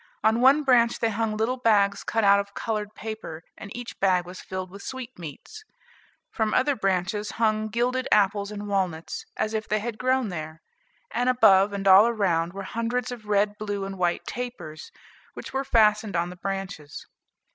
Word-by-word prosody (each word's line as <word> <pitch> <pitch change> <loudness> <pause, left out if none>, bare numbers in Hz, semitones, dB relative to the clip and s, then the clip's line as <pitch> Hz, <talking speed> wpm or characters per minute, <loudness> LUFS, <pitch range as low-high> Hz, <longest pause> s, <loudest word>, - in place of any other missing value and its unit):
On 220 +2 +3
one 275 +4 +6
branch 240 -3 +4
they 230 -1 0
hung 215 0 -1
little 235 +4 0
bags 205 -5 +2
cut 225 0 0
out 200 0 +6
of 200 0 -6
colored 215 -2 -3
paper, 215 -7 -7
and 200 - -10
each 245 -1 -8
bag 185 -2 +2
was 180 +1 -9
filled 185 -1 -6
with 200 +1 -10
sweetmeats; 255 - -8 0.7
from 220 -1 0
other 275 +2 +2
branches 195 +1 -1
hung 215 -1 +1
gilded 250 +4 -1
apples 200 0 +3
and 205 0 -6
walnuts, 185 -5 -2
as 215 - -1
if 220 0 -2
they 215 - +2
had 215 +1 -5
grown 255 -2 +1
there; 160 -2 -7 0.5
and 245 +1 +1
above, 210 -5 +5
and 200 -1 -3
all 200 +5 +8
round, 175 -6 0
were 195 +1 -7
hundreds 230 +5 -2
of 235 -3 -8
red, 205 0 +1
blue, 205 -2 -3
and 195 0 -6
white 175 -1 0
tapers, 190 -11 -7 0.4
which - - -8
were 270 0 0
fastened 215 -4 +3
on 170 +1 0
the - - -9
branches. 195 -5 -6
210 Hz, 180 wpm, -25 LUFS, 195-230 Hz, 0.7 s, all